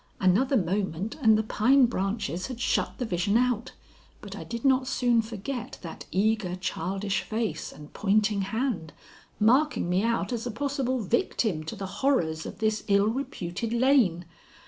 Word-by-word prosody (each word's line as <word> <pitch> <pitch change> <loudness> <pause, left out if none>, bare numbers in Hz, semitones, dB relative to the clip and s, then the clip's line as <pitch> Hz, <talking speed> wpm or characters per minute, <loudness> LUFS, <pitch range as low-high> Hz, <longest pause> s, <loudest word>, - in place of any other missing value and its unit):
Another 220 +9 +3
moment 190 +1 -1
and 220 -3 +6
the 220 - +1
pine 250 +5 +4
branches 195 -4 -2
had 255 -3 -7
shut 255 - 0
the 250 - -2
vision 200 +2 +1
out, 245 -2 0 0.5
but - - -9
I - - -7
did 235 +2 -6
not 260 -1 +3
soon 245 -3 +2
forget 225 +3 -6
that 165 - -8
eager, 200 -1 +1
childish 190 +2 -2
face 220 0 -3
and 150 0 -13
pointing 210 0 +2
hand, 200 - -2 0.5
marking 255 - +3
me 180 +2 +2
out 230 +2 0
as 235 +1 -3
a - - -3
possible 265 +1 -1
victim 215 -5 0
to 160 - -5
the 195 - -5 0.2
horrors 165 - +1
of - - -8
this 215 0 0
ill 200 +1 +4
reputed 225 -5 -4
lane. 235 -9 +3
220 Hz, 160 wpm, -27 LUFS, 190-245 Hz, 0.5 s, and